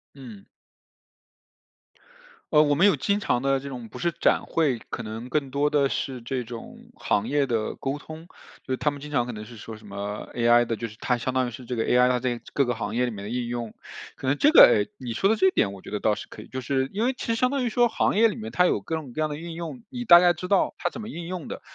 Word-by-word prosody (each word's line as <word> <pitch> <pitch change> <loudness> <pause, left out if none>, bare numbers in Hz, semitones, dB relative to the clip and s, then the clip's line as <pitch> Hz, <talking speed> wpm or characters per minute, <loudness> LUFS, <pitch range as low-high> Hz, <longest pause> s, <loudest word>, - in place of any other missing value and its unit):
嗯。 115 -8 -11 2.1
呃， 150 - +7
我 145 -1 +3
们 170 +7 +4
有 205 - +4
经 200 0 +1
常 125 -10 0
的 135 0 +1
这 140 - -7
种 125 -4 -7
不 - - -11
是 170 - 0
展 - - +2
会， 150 -7 +1
可 115 - -4
能 110 +3 -7
更 140 -1 -1
多 140 +3 +1
的 145 -2 +3
是 130 -2 -3
这 125 +2 -3
种 115 0 -10
行 105 0 0
业 145 0 +2
的 115 -4 -2
沟 135 +1 -3
通。 160 +3 -11 0.4
就 130 - -1
是 - - -1
它 150 - +1
们 145 - -8
经 150 +1 -9
常 140 -5 +1
可 125 - -5
能 105 -2 -8
是 115 - -12
说 110 0 -9
什 110 -1 -15
么 100 +1 -5
AI 120 0 +4
的 115 - -2
就 115 +1 -5
是 110 - -15
它 125 - 0
相 125 +2 -3
当 130 -1 +1
于 - - -6
是 125 - -9
这 125 0 -5
个 115 - 0
AI 125 0 +4
它 125 0 +1
在 120 -1 -2
各 140 - +2
个 125 -1 -1
行 110 -2 -4
业 125 +2 +1
里 120 - -2
面 100 -2 -7
的 105 - -6
应 120 0 -2
用。 120 -2 -4 0.4
可 135 - -6
能 140 +2 +2
这 295 - +5
个， - - +10
诶， - - +2
你 120 -3 -5
说 195 - +2
的 220 - +2
这 190 - +4
一 - - +4
点 100 - +1
我 100 -1 -10
觉 - - -11
得 105 - -3
倒 110 - +3
是 105 - -7
可 - - -11
以， - - -14
就 130 - -5
是 130 +1 -1
因 215 +4 -1
为 260 - +1
其 - - -7
实 230 - +1
相 250 +2 +1
当 280 -2 0
于 245 - 0
说 240 +2 +3
行 225 - 0
业 230 +1 +6
里 215 - -3
面 225 0 -7
它 180 - +3
有 - - +1
各 165 - -3
种 140 -6 -8
各 155 - -3
样 155 - +1
的 145 0 -5
应 170 0 -7
用， 170 +9 -6
你 245 -2 -6
大 175 -7 +9
概 175 0 +4
知 180 +1 -7
道 200 -2 +2
它 175 - -1
怎 - - -9
么 215 - -7
应 170 -6 -7
用 180 -3 -5
的， - - -7
135 Hz, 320 characters per minute, -25 LUFS, 120-170 Hz, 2.1 s, 个